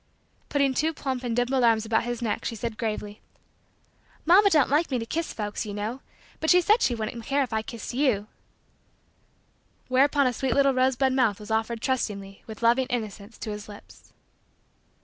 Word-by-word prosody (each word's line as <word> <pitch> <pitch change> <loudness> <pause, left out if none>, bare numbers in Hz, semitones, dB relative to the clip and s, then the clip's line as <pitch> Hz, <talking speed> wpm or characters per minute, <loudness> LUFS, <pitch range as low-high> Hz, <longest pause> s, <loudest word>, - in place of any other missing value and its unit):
Putting 280 -2 +2
two 315 +4 0
plump 260 -3 -3
and 235 -2 -2
dimpled 245 +1 +1
arms 225 -2 +3
about 225 +1 +1
his 240 0 -3
neck 220 - -2
she 230 - -3
said 230 0 -4
gravely: 210 -2 -4 1.0
"Mamma 390 +5 +6
don't 300 -7 +3
like 310 +4 +2
me 260 - 0
to 230 - -3
kiss 330 +7 -3
folks, 210 -1 -4
you 205 -2 -6
know, 220 +6 -4 0.4
but 315 - -1
she 360 - +7
said 420 +7 +3
she 240 - +2
wouldn't 225 +1 -5
care 280 +3 +1
if 245 - -6
I 220 - +1
kissed 225 0 -7
you" 245 -6 +1 1.6
Whereupon 280 +2 +3
a 250 - +2
sweet 255 0 -1
little 275 -1 +4
rosebud 260 +1 +2
mouth 235 -6 +2
was 210 +1 -9
offered 225 +1 -1
trustingly, 200 -7 -3
with 220 +1 -9
loving 240 +3 +3
innocence, 215 -2 -5
to 215 - -5
his 210 0 -7
lips. 205 - -14
240 Hz, 185 wpm, -26 LUFS, 220-270 Hz, 1.6 s, she